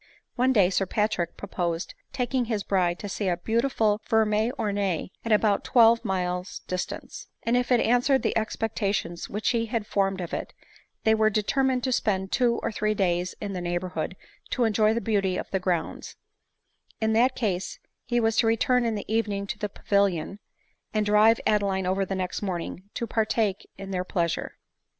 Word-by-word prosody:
One 255 +1 +3
day 195 -7 +4
Sir 195 0 +1
Patrick 210 -5 -1
proposed 175 -3 -3 0.2
taking 250 -1 0
his 220 -3 -2
bride 180 -3 +1
to 205 - -6
see 200 0 -3
a 175 -2 +1
beautiful 220 +1 +1
ferine 220 0 +2
ornee 200 -6 -1
at 230 - -3
about 210 -1 +3
twelve 230 -2 +5
miles 180 -1 -2
distance; 185 0 -5 0.2
and 235 - +1
if 245 +1 0
it 245 - +5
answered 245 +4 +3
the - - 0
expectations 210 -5 -2
which 210 +2 -1
he 230 -1 0
had 225 -2 -2
formed 195 -2 0
of 175 -2 -5
it, - - -4 0.5
they 220 - +4
were 220 0 +4
determined 250 +5 +1
to 260 - 0
spend 190 -5 0
two 240 -2 +2
or - - -1
three 215 0 0
days 180 -2 0
in 205 -2 -4
the 180 - -3
neighborhood 175 0 -3 0.3
to 250 - 0
enjoy 220 0 +3
the 235 - 0
beauty 195 -5 0
of - - -5
the 190 - +1
grounds; 180 -3 -2 0.8
in 220 0 +1
that 245 +4 +3
case 190 -6 -2 0.3
he 240 0 0
was 225 -1 +2
to 225 - +4
return 240 +2 +2
in 225 -1 0
the 205 - -5
evening 210 -2 0
to - - -5
the 210 - -2
Pavil 200 0 +2
ion, 175 +4 -6 0.6
and 215 -1 +2
drive 210 +2 +5
Adeline 200 -3 +1
over 190 +1 +1
the 195 - -3
next 185 -1 -3
morning 185 0 -4
to 235 - -2
partake 220 -3 0
in 195 0 -7
their 180 -1 -1
pleasure. 170 -2 -2
210 Hz, 180 wpm, -26 LUFS, 190-225 Hz, 0.8 s, twelve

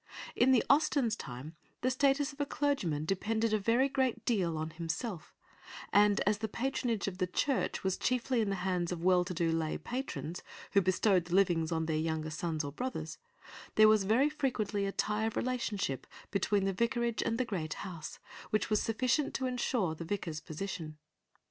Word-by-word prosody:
In 250 +2 +4
the 255 - +5
Austens' 280 -6 +3
time 135 - -8 0.3
the 255 - +2
status 275 +2 +2
of 285 - -6
a - - +1
clergyman 185 - 0
depended 220 +5 0
a 215 - +3
very 230 +6 +3
great 265 -3 0
deal 180 -9 +1
on 160 +1 -3
himself, 165 +4 -4 0.6
and 205 +1 +5
as 205 +1 +1
the 220 - -1
patronage 235 -2 -1
of 190 -1 -4
the 185 - +1
Church 265 +8 0
was 190 -1 0
chiefly 250 0 +1
in 210 - 0
the 195 - 0
hands 180 -2 0
of 180 - -2
the - - -4
well 180 -1 +5
to 180 - -6
do 165 -1 +1
lay 160 -1 -1
patrons, 240 - -4 0.3
who 200 - +5
bestowed 185 0 +3
the 175 +1 -1
livings 175 -4 +3
on 160 -1 0
their 160 -1 0
younger 155 0 -1
sons 160 0 -2
or 140 - -4
brothers, 255 - -4 0.6
there 215 0 +8
was 215 -2 +4
very 235 +8 +4
frequently 220 -9 -1
a - - -1
tie 210 +2 0
of 225 - -2
relationship 225 - -2 0.2
between 200 0 +1
the 195 - +1
vicarage 235 +2 0
and 230 - 0
the 255 - +1
great 165 -9 -3
house, 170 -5 -7 0.3
which 215 +1 0
was 215 - +3
sufficient 255 +6 0
to 260 - -1
ensure 245 -8 0
the 160 - -7
vicar's 165 -3 -3
position. 160 -2 -6
205 Hz, 190 wpm, -32 LUFS, 170-240 Hz, 0.6 s, there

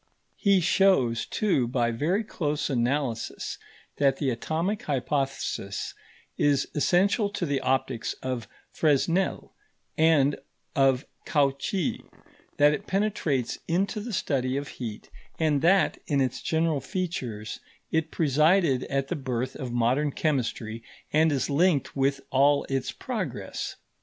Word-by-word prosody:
He 200 -3 +4
shows, 170 -10 +3
too, 180 - +1
by 120 -1 +1
very 165 - 0
close 150 -9 -2
analysis, 120 -2 -1 0.4
that 135 -1 +3
the 135 -3 0
atomic 165 - -2
hypothesis 135 -6 -2 0.5
is 140 -2 +3
essential 195 +7 +2
to 200 -3 -3
the 140 -3 0
optics 130 -3 -1
of 130 -3 -3 0.2
Fresnel 165 +5 +1 0.5
and 150 -3 +4 0.4
of 135 -1 +3 0.2
Cauchy; 145 +4 0 0.5
that 145 +1 +6
it - - -5
penetrates 190 - 0
into 195 +5 0
the 230 +3 -5
study 135 - 0
of 140 0 -4
heat; 110 -4 -7 0.3
and 155 -3 +2
that, 190 +4 +3
in 145 -2 +1
its 130 -2 0
general 160 -3 +1
features, 130 - -4 0.3
it 160 -1 +1
presided 155 -2 +3
at 135 -1 -1
the - - -1
birth 130 -3 -3
of 125 -2 -5
modern 125 +5 +1
chemistry 115 -7 -1 0.3
and 155 +1 +4
is 135 -3 0
linked 155 +1 +2
with 135 0 +1
all 140 +2 +4
its 135 -1 -1
progress. - - -4
140 Hz, 125 wpm, -27 LUFS, 130-165 Hz, 0.5 s, that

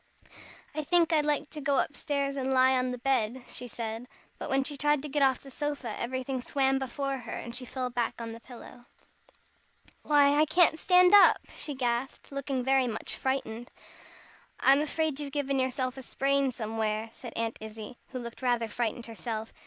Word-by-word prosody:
"I 305 - -2
think 340 +1 +3
I'd 300 -2 +3
like 295 0 0
to 300 - -6
go 280 0 +1
up 285 - 0
stairs 280 -2 -1
and 265 -1 -1
lie 260 0 +5
on 255 0 +1
the 250 - -3
bed," 250 -1 0
she 245 - -7
said. 230 +1 -5 0.3
But - - -5
when 270 0 +2
she 290 +2 -5
tried 295 0 +2
to - - -4
get 290 +1 0
off 265 -2 +3
the 275 - -11
sofa, 290 -6 -3
everything 260 +1 -3
swam 270 +1 +1
before 270 +1 -3
her, 245 - -8
and 235 0 -7
she 255 - -4
fell 250 0 -3
back 240 -1 -1
again 230 -1 -6
on - - -6
the 230 - -9
pillow. 240 0 -13 1.2
"Why, 290 -1 +4
I 305 - +6
can't 320 0 +4
stand 360 +1 +5
up!" 410 - +8 0.2
she 290 - -5
gasped, 245 +1 -2
looking 275 -2 -2
very 265 0 +3
much 220 -2 -3
frightened. 240 -3 -2 0.9
"I'm 275 +2 +5
afraid 310 -1 -1
you've 285 -2 -5
given 275 -2 0
yourself 260 0 -1
a - - -6
sprain 275 +1 +1
somewhere," 220 -1 -2
said 240 -3 -10
Aunt 230 0 -2
Izzie, 220 +2 -8
who 260 - -7
looked 235 0 -7
rather 240 -2 +1
frightened 235 +1 -2
herself. 225 -1 -5
265 Hz, 190 wpm, -29 LUFS, 240-280 Hz, 1.2 s, up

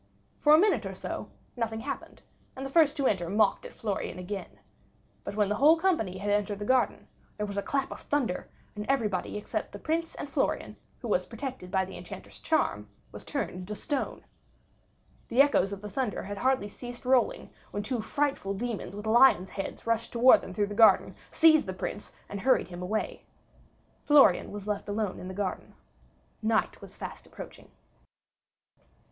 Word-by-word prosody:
For 300 0 +7
a - - +6
minute 330 - +3
or 190 - -6
so - - -5 0.3
nothing 225 -2 -2
happened, - - -6 0.3
and 265 - -5
the 270 - -6
first 305 -1 +4
to 280 - 0
enter 175 -8 +1
mocked 210 +1 +2
at - - -15
Florian 200 -4 -3
again; 190 +2 -6 0.6
but - - -5
when 210 -1 +2
the 205 - 0
whole 300 +6 +6
company 320 - +1
had 205 +2 -2
entered 205 0 0
the 205 - -5
garden, 255 +2 +1 0.3
there 210 - -1
was 200 -1 -5
a 200 - 0
clap 270 +5 -1
of - - -7
thunder, 260 -11 -1 0.3
and 210 - -4
everybody 210 -9 0
except 210 - -4
the - - -7
Prince 330 +1 -2
and - - -5
Florian, - - -1 0.3
who - - -3
was - - +1
protected 260 -10 -6
by 190 0 +1
the 190 - -10
Enchanter's 175 0 -10
charm, 105 0 0 0.2
was - - -9
turned - - -2
into 180 +3 -6
stone. 280 +6 -3 1.0
The 240 - -1
echoes 275 -9 +5
of 200 -1 -6
the 210 - -6
thunder 245 -3 -2
had 200 +1 -6
hardly 260 -2 +2
ceased 245 +4 -9
rolling 265 - +2 0.2
when 205 - -4
two 240 +1 -2
frightful 270 -5 -1
demons 220 -2 -4
with 205 +1 -7
lions' 220 -5 +5
heads 195 - -6
rushed 230 0 0
towards 245 +2 +6
them - - -8
through 205 +3 0
the 205 - -6
garden, 220 +1 +5 0.2
seized 315 -5 +5
the 190 - -3
Prince, 185 - -5 0.2
and 200 - -5
hurried 260 -3 +3
him 175 0 -7
away. 210 +4 -2 0.8
Florian 280 -11 +5
was 205 -1 -7
left 210 0 -3
alone 205 -2 -2
in 185 - -7
the 185 - -6
garden. 195 -2 -4 0.7
Night 220 0 0
was - - -11
fast - - -8
approaching. - - -11
215 Hz, 185 wpm, -29 LUFS, 195-265 Hz, 1.0 s, For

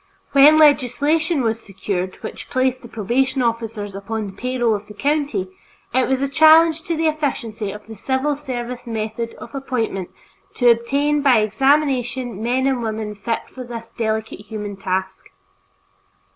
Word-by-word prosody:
When 285 +3 +7
legislation 295 +2 +3
was 225 0 0
secured 190 -2 -4
which - - -7
placed 255 0 0
the 235 - -10
probation 250 +5 0
officers 225 -3 -2
upon 210 +3 -4
the 195 - -8
payroll 240 +1 0
of 205 0 -4
the 210 - -12
county, 280 -10 -1 0.4
it 260 +1 +3
was 265 0 +1
a - - +1
challenge 315 +3 +6
to 335 -1 -1
the 325 - 0
efficiency 245 -9 -2
of 210 - -10
the 220 - -10
civil 265 +6 0
service 250 -4 -6
method 225 +1 -4
of - - -11
appointment 235 -9 -2 0.5
to 245 -2 +5
obtain 280 +6 +1
by 255 -6 +5
examination 255 -1 +1
men 250 +3 +1
and 265 -3 +1
women 220 -1 -3
fitted 225 +3 -4
for 255 - -7
this 230 -2 -8
delicate 220 -2 -2
human 210 -1 -6
task. 190 0 -3
240 Hz, 155 wpm, -21 LUFS, 215-275 Hz, 0.5 s, When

